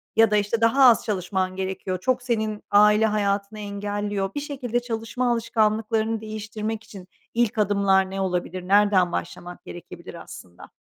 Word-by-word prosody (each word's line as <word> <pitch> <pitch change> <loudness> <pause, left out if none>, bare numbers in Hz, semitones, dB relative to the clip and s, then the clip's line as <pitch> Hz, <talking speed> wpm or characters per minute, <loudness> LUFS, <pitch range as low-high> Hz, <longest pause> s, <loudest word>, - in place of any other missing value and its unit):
Ya 225 -1 +5
da, 210 - +4
işte, 210 +3 -1
daha 245 +4 +4
az 235 -3 +5
çalışman 185 -2 -2
gerekiyor, 190 -1 -3
çok 255 +5 0
senin 220 -4 -2
aile 210 +1 +5
hayatını 205 0 -1
engelliyor. 205 -1 -3
Bir - - -1
şekilde 265 -5 -3
çalışma 240 +1 -2
alışkanlıklarını 225 -1 0
değiştirmek 215 0 -5
için 200 -5 -12 0.3
ilk 235 -2 0
adımlar 200 -2 +2
ne 195 - -3
olabilir? 180 -1 -3
Nereden 195 -3 +4
başlamak 175 +1 -6
gerekebilir 170 -1 -10
aslında? 90 -1 -13
210 Hz, 145 wpm, -24 LUFS, 195-225 Hz, 0.3 s, Ya